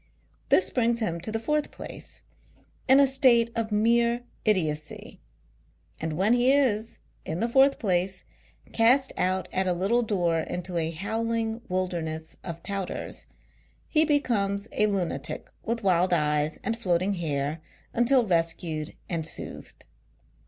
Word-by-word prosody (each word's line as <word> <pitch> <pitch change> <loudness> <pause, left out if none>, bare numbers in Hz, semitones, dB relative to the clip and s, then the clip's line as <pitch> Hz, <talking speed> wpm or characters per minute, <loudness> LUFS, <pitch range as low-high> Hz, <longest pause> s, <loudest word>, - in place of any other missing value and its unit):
This 375 - +4
brings 235 -2 +1
him 170 -7 -2
to 200 +6 -4
the 225 - -1
fourth 300 +6 -1
place, - - -10 0.6
in 265 +1 +7
a 280 - +7
state 255 -3 +4
of 225 -2 -2
mere 235 +3 +2 0.2
idiotcy; 155 -7 -1 0.8
and 160 -1 -3
when 200 +5 +3
he 245 +2 +4
is, 230 -6 +1 0.3
in 160 +2 -4
the 230 - +1
fourth 270 +3 +4
place, 185 -2 0 0.5
cast 255 +4 +4
out 185 0 0
at 190 0 +1
a 180 - +2
little 195 +7 +1
door 175 -7 0
into 175 +2 -4
a 160 -1 0
howling 225 +6 -2
wilderness 165 -4 -3
of 170 -2 -7
touters, 195 -2 -4 0.6
he 310 -1 +3
becomes 220 -9 0
a 210 - +2
lunatic 180 -7 -2
with 230 0 -2
wild 180 -1 +3
eyes 150 -1 +1
and 230 0 -2
floating 185 -1 +1
hair 150 -3 -2 0.3
until 240 +1 +3
rescued 165 -3 -1
and 165 -2 -2
soothed. 155 - -7
200 Hz, 140 wpm, -26 LUFS, 170-235 Hz, 0.8 s, in